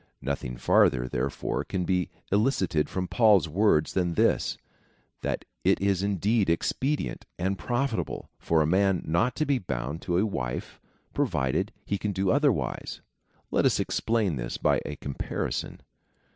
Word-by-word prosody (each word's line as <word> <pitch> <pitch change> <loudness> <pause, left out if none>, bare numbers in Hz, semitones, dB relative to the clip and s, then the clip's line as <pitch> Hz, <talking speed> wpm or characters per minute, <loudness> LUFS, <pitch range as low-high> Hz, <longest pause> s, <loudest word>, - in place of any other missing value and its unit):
Nothing 65 -3 -3
farther, 60 +1 +3
therefore, 65 +2 -2
can 90 -2 -2
be 90 -1 0 0.2
elicited 100 - +1
from 90 -1 -2
Paul's 105 -7 +4
words 80 -2 +2
than 85 -2 0
this - - +2 0.3
— - - -40
that - - -2 0.2
it - - +3
is 100 -2 +1
indeed 100 +1 +1
expedient 135 - -1
and 95 +2 0
profitable 120 - -2
for 80 -1 +2
a - - 0
man 95 +2 +2
not 85 +11 +1
to 155 - 0
be 140 -3 +1
bound 70 - -4
to 85 - 0
a 100 - +3
wife, 60 - -4 0.3
provided 65 0 0
he 100 - -1
can 105 -1 -2
do 95 0 +1
otherwise. 140 - 0 0.5
Let - - +2
us - - +3
explain 110 -9 0
this - - -4
by - - +2
a - - -4
comparison. 70 -1 -4
95 Hz, 150 wpm, -27 LUFS, 75-105 Hz, 0.5 s, Paul's